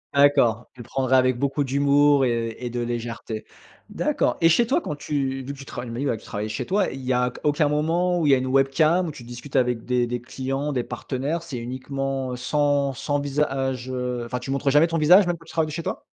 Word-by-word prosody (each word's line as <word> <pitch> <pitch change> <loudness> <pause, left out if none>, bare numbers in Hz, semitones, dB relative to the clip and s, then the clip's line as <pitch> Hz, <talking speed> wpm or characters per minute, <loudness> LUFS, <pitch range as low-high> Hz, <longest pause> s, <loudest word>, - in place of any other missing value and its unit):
D'accord, 135 -5 +4
tu 125 - -21
le - - -7
prendrais 130 +1 +1
avec 130 -1 +3
beaucoup 140 +2 0
d'humour 140 +1 +3
et 115 -2 -1
et 120 - -3
de 120 - -3
légèreté. 115 -2 -4 0.5
D'accord. - - 0
Et 165 - +6
chez 235 +9 +4
toi, 280 +9 +1
quand 150 - -4
tu 135 -2 -2
vu 140 +2 -5
que - - -12
tu 140 - -9
travailles, 125 -1 -7
tu - - -6
m'as 120 - -5
dit, 140 - -1
ouais, 120 - +1
que 110 - -11
tu - - -16
travaillais 105 +1 -4
chez 110 - -3
toi, 195 0 +1
il 135 - -7
y 130 - 0
a 125 0 +2
q - - -12
aucun 150 0 +2
moment 170 +4 +1
où 165 - 0
il 145 - +4
y - - +7
a - - +1
une 130 - -3
webcam 135 +7 +3
où - - -4
tu 130 - -11
discutes 120 +4 -10
avec 125 -3 +1
des 125 -1 +1
des 120 +1 -3
clients, 135 +4 -3
des 125 -2 0
partenaires? 135 +7 -3
C'est 145 -7 -6
uniquement 130 +1 -3
sans 140 +2 +1
sans 145 +3 -1
visage, 135 -3 -1
heu, 125 -1 -3
enfin, 125 +1 -4
tu 135 - -8
montres 140 +1 +1
jamais 150 +4 +5
ton 165 0 -1
visage, 175 +5 +6
même 175 -1 0
que 165 - -18
tu - - -12
travailles 160 -2 +1
de - - -6
chez 165 +2 -4
toi? - - -4
135 Hz, 260 wpm, -24 LUFS, 125-150 Hz, 0.5 s, y